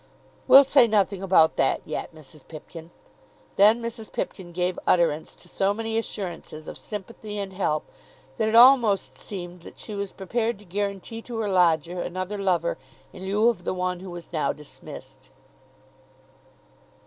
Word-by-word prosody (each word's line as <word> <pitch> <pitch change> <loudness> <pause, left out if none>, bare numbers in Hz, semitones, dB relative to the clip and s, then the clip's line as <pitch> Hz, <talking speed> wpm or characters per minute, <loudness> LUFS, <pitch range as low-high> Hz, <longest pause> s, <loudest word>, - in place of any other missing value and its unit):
"We'll 275 - +10
say 270 -3 +5
nothing 200 -3 +1
about 180 -5 +4
that 135 - +1
yet, - - -5
Mrs. 155 -2 -15
Pipkin." 165 +1 -11 0.7
Then 215 +4 +5
Mrs. 230 -1 -6
Pipkin 180 -3 -5
gave 180 +1 -1
utterance 160 -3 +2
to - - -16
so 195 +3 0
many 225 0 -3
assurances 175 -8 -5
of - - -7
sympathy 210 0 -7
and 195 -1 -4
help 155 -5 -1 0.5
that 220 - +1
it 220 - 0
almost 235 -5 +6
seemed 180 -3 -8
that - - -13
she 215 - -8
was 200 -1 -4
prepared 225 +4 -2
to 205 - -17
guarantee 200 +4 -4
to 235 0 -7
her 215 -2 -1
lodger 175 -2 +2
another 185 +3 -4
lover 175 -4 0 0.3
in 190 +1 -8
lieu 210 +4 +3
of 200 -7 -3
the 185 - -2
one 180 -1 -2
who 190 +1 -9
was 175 0 -9
now 155 - +1
dismissed. 150 -1 -11
190 Hz, 160 wpm, -25 LUFS, 175-215 Hz, 0.7 s, We'll